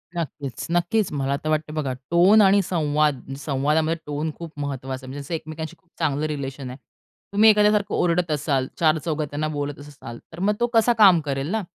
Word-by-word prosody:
नक्कीच. 145 Hz, -6 st, -5 dB
नक्कीच 175 Hz, +4 st, +1 dB
मला 140 Hz, -1 st, -1 dB
तर 155 Hz, -, -2 dB
वाटतंय 155 Hz, 0 st, -1 dB
बघा, 140 Hz, -4 st, -2 dB, 0.2 s
टोन 185 Hz, +6 st, +6 dB
आणि 200 Hz, 0 st, +5 dB
संवाद 150 Hz, -5 st, +1 dB, 0.2 s
संवादामध्ये 150 Hz, +3 st, 0 dB
टोन 150 Hz, +2 st, -3 dB
खूप 170 Hz, -2 st, -8 dB
महत्त्वाचा 135 Hz, -2 st, -5 dB
आहे. 130 Hz, -, -8 dB
म्हणजे 145 Hz, +4 st, -5 dB
एकमेकांशी 160 Hz, +1 st, -7 dB
खूप 185 Hz, -, -38 dB
चांगलं 145 Hz, 0 st, 0 dB
रिलेशन 135 Hz, -3 st, -5 dB
आहे. 125 Hz, -, -8 dB, 0.6 s
तुम्ही 215 Hz, +2 st, +6 dB
एखाद्याला 210 Hz, 0 st, +5 dB
सारखं 200 Hz, -, -3 dB
ओरडत 175 Hz, -1 st, +1 dB
असाल, 140 Hz, -3 st, 0 dB
चारचौघात 155 Hz, -1 st, +1 dB
त्यांना 150 Hz, +2 st, -2 dB
बोलतच 145 Hz, 0 st, -5 dB
असाल. 120 Hz, -5 st, -10 dB
तर 165 Hz, -, -9 dB
मग 200 Hz, +3 st, +2 dB
तो 240 Hz, -, +2 dB
कसा 230 Hz, +1 st, +4 dB
काम 195 Hz, -6 st, +7 dB
करेल 140 Hz, -1 st, -3 dB
ना? 220 Hz, +1 st, 0 dB
155 Hz, 185 wpm, -23 LUFS, 140-175 Hz, 0.6 s, काम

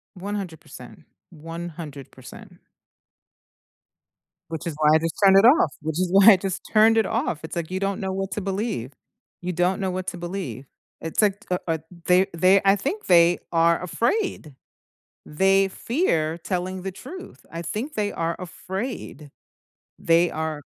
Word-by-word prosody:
100%. 190 Hz, -4 st, -8 dB, 0.3 s
100%. 165 Hz, -3 st, -9 dB, 1.9 s
Which 160 Hz, 0 st, -5 dB
is 165 Hz, -, -3 dB
why 150 Hz, -, +4 dB
I -, -, +5 dB
just 165 Hz, 0 st, -3 dB
turned 195 Hz, 0 st, +7 dB
it 205 Hz, -, +5 dB
off, 325 Hz, +8 st, +5 dB
which 160 Hz, +2 st, -3 dB
is 185 Hz, -, +1 dB
why 195 Hz, +3 st, +8 dB
I -, -, +5 dB
just 190 Hz, 0 st, -4 dB
turned 225 Hz, +1 st, +5 dB
it 220 Hz, -, +3 dB
off, 220 Hz, -9 st, -2 dB
it's -, -, -6 dB
like 170 Hz, 0 st, -4 dB
you 185 Hz, -, -2 dB
don't 195 Hz, 0 st, -2 dB
know 190 Hz, -1 st, -2 dB
what 195 Hz, 0 st, -4 dB
to 210 Hz, -, -2 dB
believe. 195 Hz, -, -3 dB, 0.5 s
You 180 Hz, 0 st, -3 dB
don't 180 Hz, +3 st, 0 dB
know 190 Hz, -1 st, -1 dB
what 185 Hz, 0 st, -5 dB
to 175 Hz, -, -4 dB
believe. 170 Hz, -, -6 dB, 0.3 s
It's 165 Hz, +6 st, -1 dB
like, 205 Hz, -1 st, +2 dB
u -, -, +3 dB
o 160 Hz, -1 st, +1 dB, 0.3 s
the 180 Hz, -, +7 dB, 0.2 s
they 185 Hz, +3 st, +5 dB
I 195 Hz, 0 st, +6 dB
think 305 Hz, -, -4 dB
they 175 Hz, 0 st, +5 dB
are 165 Hz, 0 st, +3 dB
afraid. 240 Hz, -, -1 dB, 1.0 s
They 195 Hz, 0 st, +5 dB, 0.3 s
fear 165 Hz, -, +1 dB
telling 185 Hz, +1 st, -3 dB
the 190 Hz, -, -3 dB
truth, 350 Hz, -, -10 dB
I 165 Hz, -, -6 dB
think 215 Hz, -, -3 dB
they 205 Hz, -1 st, -1 dB
are 165 Hz, 0 st, -2 dB
afraid. 190 Hz, -, -6 dB, 0.8 s
They 170 Hz, +1 st, +3 dB
are 155 Hz, -2 st, -4 dB
185 Hz, 160 wpm, -24 LUFS, 165-200 Hz, 1.9 s, why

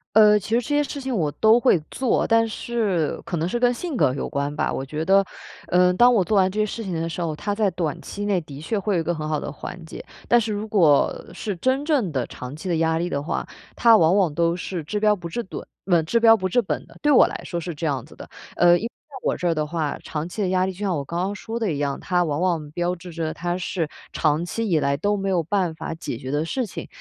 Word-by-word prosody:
呃， 210 Hz, -1 st, +7 dB
其 205 Hz, -, -6 dB
实 230 Hz, -, +2 dB
这 245 Hz, +5 st, -1 dB
些 295 Hz, -, +3 dB
事 285 Hz, 0 st, -5 dB
情 265 Hz, -2 st, -3 dB
我 155 Hz, -7 st, 0 dB
都 220 Hz, +6 st, +4 dB
会 240 Hz, -10 st, +3 dB
做， 260 Hz, -3 st, 0 dB
但 230 Hz, 0 st, +4 dB
是 215 Hz, -7 st, -1 dB
可 175 Hz, -, -3 dB
能 165 Hz, +2 st, 0 dB
是 240 Hz, -, -1 dB
跟 245 Hz, 0 st, +3 dB
性 330 Hz, +3 st, -4 dB
格 145 Hz, -, +3 dB
有 140 Hz, -, -3 dB
关 140 Hz, -1 st, -2 dB
吧。 150 Hz, -, -1 dB
我 135 Hz, -, -3 dB
觉 155 Hz, +3 st, -4 dB
得， 195 Hz, +1 st, +5 dB, 0.5 s
呃， 180 Hz, 0 st, +4 dB
当 245 Hz, +5 st, +6 dB
我 220 Hz, -, +4 dB
做 210 Hz, +4 st, 0 dB
完 190 Hz, -1 st, +4 dB
这 210 Hz, -, -3 dB
些 215 Hz, -, +3 dB
事 225 Hz, +2 st, -5 dB
情 190 Hz, -, -5 dB
的 165 Hz, 0 st, -2 dB
时 165 Hz, +2 st, -4 dB
候， 165 Hz, -2 st, -1 dB
它 205 Hz, +6 st, -3 dB
在 210 Hz, -3 st, +1 dB
短 165 Hz, -5 st, -2 dB
期 205 Hz, 0 st, -6 dB
内 195 Hz, -4 st, +1 dB
的 145 Hz, -3 st, -10 dB
确 185 Hz, +9 st, -2 dB
会 200 Hz, 0 st, 0 dB
有 170 Hz, -, +2 dB
一 -, -, -1 dB
个 170 Hz, +2 st, -1 dB
很 155 Hz, -1 st, -4 dB
好 150 Hz, -, 0 dB
的 -, -, -5 dB
缓 165 Hz, +4 st, -8 dB
解， -, -, -9 dB, 0.2 s
但 240 Hz, -, +5 dB
是 220 Hz, -, -2 dB
如 210 Hz, +1 st, -3 dB
果 165 Hz, -9 st, +3 dB
是 200 Hz, +1 st, -4 dB
真 260 Hz, -, 0 dB
正 265 Hz, -, +1 dB
的 130 Hz, -4 st, -2 dB
长 125 Hz, +1 st, -8 dB
期 160 Hz, +6 st, -8 dB
的 175 Hz, -, +1 dB
压 160 Hz, 0 st, +2 dB
力 175 Hz, +1 st, -1 dB
的 140 Hz, -3 st, -2 dB
话， -, -, -3 dB, 0.3 s
它 230 Hz, -1 st, +7 dB
往 175 Hz, 0 st, +4 dB
往 180 Hz, -7 st, +2 dB
都 170 Hz, 0 st, +2 dB
是 175 Hz, -1 st, -4 dB
治标不治本 210 Hz, +2 st, -1 dB, 0.2 s
嗯， 175 Hz, -4 st, +3 dB
治 235 Hz, +8 st, +2 dB
标 225 Hz, -1 st, +7 dB
不 185 Hz, -3 st, -2 dB
治 245 Hz, +6 st, +3 dB
本 195 Hz, -, -3 dB
的， -, -, -17 dB
对 295 Hz, -, +2 dB
我 275 Hz, -, +7 dB
来 -, -, -6 dB
说 175 Hz, -, -4 dB
是 175 Hz, 0 st, -5 dB
这 160 Hz, +2 st, -5 dB
样 135 Hz, -4 st, -1 dB
子 -, -, -16 dB
的。 -, -, -10 dB, 0.3 s
呃， 175 Hz, 0 st, +6 dB
因 -, -, -7 dB
为 -, -, 0 dB
在 280 Hz, +3 st, -19 dB
我 -, -, +1 dB
这 180 Hz, -, -2 dB
儿 165 Hz, -, +1 dB
的 155 Hz, -, 0 dB
话， 155 Hz, -3 st, -2 dB
长 155 Hz, +1 st, -4 dB
期 210 Hz, -, -5 dB
的 190 Hz, -, +1 dB
压 185 Hz, 0 st, +2 dB
力 190 Hz, -, -2 dB
就 185 Hz, -, -13 dB
像 195 Hz, -4 st, 0 dB
我 145 Hz, -, -2 dB
刚 170 Hz, +5 st, -4 dB
刚 195 Hz, +2 st, -1 dB
说 225 Hz, +2 st, -5 dB
的 220 Hz, -6 st, 0 dB
一 -, -, -3 dB
样， 140 Hz, -1 st, -1 dB
它 180 Hz, -1 st, +1 dB
往 150 Hz, -2 st, -1 dB
往 170 Hz, -5 st, 0 dB
标 175 Hz, +2 st, -1 dB
志 180 Hz, 0 st, -11 dB
着 160 Hz, -1 st, -3 dB
它 175 Hz, 0 st, -2 dB
是 175 Hz, -3 st, -2 dB, 0.2 s
长 155 Hz, +2 st, +1 dB
期 225 Hz, +4 st, -3 dB
以 160 Hz, -4 st, +3 dB
来 140 Hz, -1 st, +1 dB
都 205 Hz, +8 st, 0 dB
没 195 Hz, 0 st, -2 dB
有 180 Hz, -3 st, +2 dB
办 180 Hz, -1 st, 0 dB
法 160 Hz, -, -5 dB
解 155 Hz, -7 st, -5 dB
决 130 Hz, -, -7 dB
的 150 Hz, +2 st, 0 dB
事 250 Hz, +9 st, -1 dB
情。 -, -, -7 dB
180 Hz, 310 characters per minute, -23 LUFS, 160-215 Hz, 0.5 s, 呃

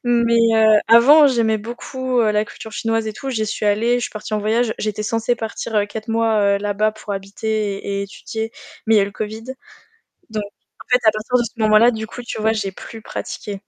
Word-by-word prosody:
Mais 235 Hz, -1 st, +3 dB, 0.2 s
heu, 220 Hz, -1 st, +5 dB
avant, 285 Hz, +7 st, +7 dB
j'aimais 230 Hz, -4 st, +2 dB
beaucoup 245 Hz, +3 st, -2 dB
la 210 Hz, -1 st, +2 dB
culture 220 Hz, -, -10 dB
chinoise 225 Hz, 0 st, -1 dB
et 215 Hz, -, -3 dB
tout, 270 Hz, +5 st, -7 dB
j'y 220 Hz, -4 st, -1 dB
suis 210 Hz, 0 st, -3 dB
allée, 220 Hz, +4 st, +2 dB
je 245 Hz, -, -2 dB
suis -, -, -5 dB
partie 215 Hz, 0 st, -8 dB
en 215 Hz, -, +1 dB
voyage, 220 Hz, +2 st, +1 dB
j'étais 215 Hz, 0 st, -3 dB
censée 230 Hz, +2 st, 0 dB
partir 225 Hz, 0 st, -5 dB
heu 205 Hz, -, +3 dB
4 220 Hz, +2 st, -8 dB
mois 225 Hz, -1 st, +1 dB, 0.2 s
heu -, -, -3 dB
là-bas 205 Hz, +1 st, 0 dB
pour 215 Hz, -1 st, -7 dB
habiter 200 Hz, +1 st, -3 dB
et 200 Hz, 0 st, -2 dB
et -, -, -1 dB
étudier, 220 Hz, +3 st, -6 dB, 0.4 s
mais 225 Hz, -, +4 dB
il -, -, +6 dB
y -, -, +5 dB
a -, -, +4 dB
eu -, -, 0 dB
le -, -, -7 dB
Covid. 215 Hz, +1 st, -5 dB, 0.9 s
Donc, 215 Hz, -1 st, -2 dB
en 205 Hz, -, -17 dB
fait, 250 Hz, -, +5 dB
parti 215 Hz, -1 st, +4 dB, 0.2 s
de -, -, -3 dB
ce 230 Hz, 0 st, -8 dB
moment-là, 215 Hz, +3 st, +6 dB
du 220 Hz, 0 st, -5 dB
coup, 245 Hz, -, -9 dB
tu 235 Hz, -, -6 dB
vois, 220 Hz, +1 st, +2 dB
j'ai 200 Hz, -3 st, -3 dB
plus 220 Hz, +3 st, -11 dB
pratiqué. 200 Hz, -2 st, -6 dB
220 Hz, 230 wpm, -20 LUFS, 210-230 Hz, 0.9 s, avant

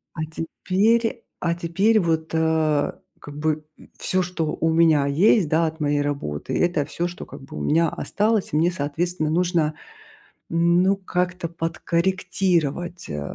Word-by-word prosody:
А 155 Hz, -, -4 dB
теперь, 210 Hz, +8 st, 0 dB, 0.2 s
а 170 Hz, -1 st, 0 dB
теперь, 190 Hz, +6 st, +2 dB
вот, 160 Hz, -3 st, 0 dB
э, 160 Hz, -2 st, +2 dB, 0.3 s
как 145 Hz, 0 st, -10 dB
бы, 155 Hz, 0 st, -1 dB
м, -, -, -17 dB
всё, 185 Hz, 0 st, 0 dB
что 175 Hz, -2 st, -2 dB
у 165 Hz, -, +2 dB
меня 160 Hz, -3 st, +4 dB
есть, 175 Hz, +6 st, +4 dB
да, 165 Hz, +1 st, +3 dB
от 160 Hz, 0 st, -4 dB
моей 145 Hz, -1 st, +1 dB
работы, 140 Hz, -, -3 dB
это 175 Hz, -5 st, +1 dB
всё, 170 Hz, +3 st, -2 dB
что 175 Hz, -, -8 dB
как -, -, -11 dB
бы 135 Hz, -, -10 dB
у -, -, -4 dB
меня 165 Hz, -, +2 dB
осталось. 210 Hz, +4 st, 0 dB
И -, -, +2 dB
мне 165 Hz, +3 st, +3 dB
соответственно 160 Hz, +1 st, -2 dB
нужно, 170 Hz, -3 st, +1 dB, 0.8 s
м, 170 Hz, +1 st, +3 dB
ну 195 Hz, +1 st, +3 dB
как-то 180 Hz, -2 st, -2 dB
подкорректировать, 175 Hz, 0 st, -1 dB
э, 75 Hz, 0 st, -3 dB
170 Hz, 155 wpm, -23 LUFS, 155-180 Hz, 0.8 s, меня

